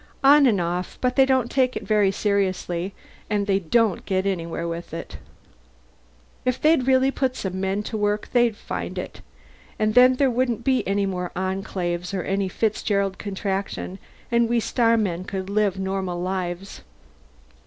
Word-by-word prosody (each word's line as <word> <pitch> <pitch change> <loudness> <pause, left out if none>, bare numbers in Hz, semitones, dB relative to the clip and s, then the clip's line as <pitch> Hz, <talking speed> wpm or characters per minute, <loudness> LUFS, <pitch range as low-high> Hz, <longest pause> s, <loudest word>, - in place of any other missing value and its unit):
"On 280 0 +7
and 210 -6 +3
off. 175 +1 -3
But 250 0 0
they 270 -1 +5
don't 260 -3 +1
take 255 -2 +2
it - - -6
very 210 -2 +3
seriously 195 -2 -1 0.3
and 205 -1 0
they 195 -1 +2
don't 205 +3 +1
get 190 0 0
anywhere 170 -3 -2
with 170 -1 -5
it. 165 - -7 1.2
If 255 0 0
they'd 305 -5 +3
really 265 0 +4
put 260 -2 -1
some 190 -4 -4
men 195 +2 -1
to 220 - -4
work 210 0 0
they'd 240 -3 +3
find - - -5
it - - -6 0.6
and 215 0 +1
then 250 +2 +7
there 270 0 +2
wouldn't 240 -2 0
be 260 0 +2
any 200 +1 +1
more 180 -2 -3
Enclaves 185 -1 -3
or 185 - -2
any 195 0 -1
Fitzgerald 200 -2 0
Contraction, 195 -1 -4 0.3
and 235 -1 +3
we 240 0 +2
starmen 220 -6 +1
could 190 0 -5
live 205 -2 +1
normal 190 -2 -2
lives." 185 +1 -4
200 Hz, 160 wpm, -24 LUFS, 185-235 Hz, 1.2 s, On